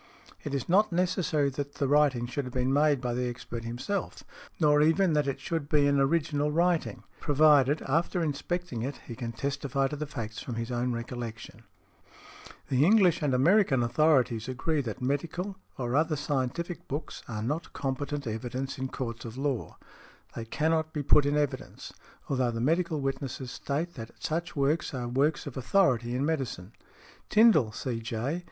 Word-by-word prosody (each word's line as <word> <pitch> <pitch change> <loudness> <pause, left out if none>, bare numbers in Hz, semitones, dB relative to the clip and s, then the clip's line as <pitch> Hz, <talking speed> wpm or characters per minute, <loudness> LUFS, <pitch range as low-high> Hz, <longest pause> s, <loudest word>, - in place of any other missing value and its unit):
It 145 -1 -3
is 135 - -3
not 205 +4 +4
necessary 170 -5 +1
that 140 +1 -5
the 140 - 0
writing 140 -4 +3
should 125 +3 -3
have 125 - -7
been 130 +1 +1
made 145 -2 +3
by 125 -1 -1
the 125 0 -1
expert 120 -1 -6
himself, 130 - -3 0.4
nor 150 -2 +5
even 165 +3 +3
that 150 -2 +2
it 135 - -2
should 160 -4 -3
be 145 -2 +4
an 140 -1 +3
original 145 +1 +1
|99| 150 - -4
writing, 175 -1 +1 0.2
provided, 145 -1 +4
after 165 +5 0
inspecting 155 -2 -3
it, 135 +4 -3
he 115 - -7
can 115 -1 -4
testify 140 +2 -1
to 150 - -4
the 150 +1 -4
facts 115 -6 -6
from 120 - -5
his 115 +2 -4
own 125 +1 0
recollection. 115 -2 -6 1.1
The 130 +1 +3
English 190 -1 +5
and 140 -4 +1
American 140 - +4
authorities 125 -3 +2
agree 145 +4 0
that 120 -1 -5
medical, 170 +8 -2 0.2
or 120 -1 -2
other 155 +1 +2
scientific 145 +5 -2
books, 145 +4 -5
are 110 -2 -4
not 150 +8 -3
competent 140 +1 -3
evidence 125 +4 -4
in 130 - -1
courts 120 -3 -5
of 115 +1 -8
law; 135 -3 -2 0.6
they 115 - -5
cannot 160 +5 0
be 150 - -2
put 145 +1 +5
in 145 +1 +1
evidence, 145 -2 -3 0.3
although 130 -3 +1
the 115 -1 -3
medical 160 +3 +1
witnesses 135 -2 -3
state 160 +5 -3
that 115 -2 -8
such 170 +2 -3
books 145 +1 0
are 125 -1 -3
works 140 +5 +1
of 145 - -7
authority 125 -5 +2
in 135 +3 0
medicine. 130 - -2 0.6
Tindal, 210 - +5
C.J. 115 +6 -3
140 Hz, 170 wpm, -29 LUFS, 125-155 Hz, 1.1 s, nor